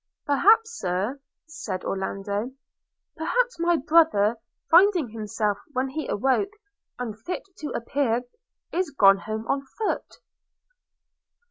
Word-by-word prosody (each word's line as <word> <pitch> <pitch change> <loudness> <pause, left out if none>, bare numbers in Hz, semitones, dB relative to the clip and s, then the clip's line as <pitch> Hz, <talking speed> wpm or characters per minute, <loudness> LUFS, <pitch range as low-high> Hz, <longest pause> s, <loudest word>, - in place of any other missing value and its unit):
'Perhaps, 445 +10 +4
Sir,' 200 +10 -2 0.3
said 315 - -5
Orlando 200 +4 -3 0.3
– - - -60
'perhaps 475 +7 0
my 340 0 +3
brother, 275 -9 +3 0.3
finding 350 - +5
himself, 210 -1 -2
when 260 +1 0
he 305 +4 -4
awoke, 270 - +1 0.4
unfit 235 - -5 0.2
to 300 - -4
appear, 245 -1 0 0.5
is 360 -1 0
gone 195 -8 +5
home 220 +2 -5
on 275 - 0 0.2
foot.' 440 - -2
270 Hz, 110 wpm, -25 LUFS, 215-335 Hz, 0.5 s, finding